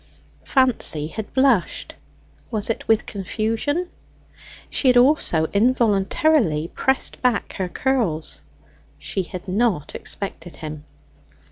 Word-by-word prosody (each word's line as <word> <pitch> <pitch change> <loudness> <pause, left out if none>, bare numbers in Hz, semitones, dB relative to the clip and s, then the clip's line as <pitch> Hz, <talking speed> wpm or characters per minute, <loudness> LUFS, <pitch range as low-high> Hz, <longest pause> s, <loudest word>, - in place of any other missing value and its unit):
Fancy 255 - +2
had 215 +4 -6
blushed; 260 - +1 0.6
was 215 0 0
it - - -6
with 225 -1 +3
confusion? 225 - -2 0.8
She 270 - 0
had 250 -1 +6
also 245 - +3
involuntarily 210 - +2
pressed 265 0 -1
back 250 -4 0
her 185 -2 -2
curls. 180 - -1 0.6
She 190 - -3
had 185 +1 -8
not 195 -5 0
expected 175 -3 -4
him. 155 -1 -8
215 Hz, 105 wpm, -22 LUFS, 175-255 Hz, 0.8 s, had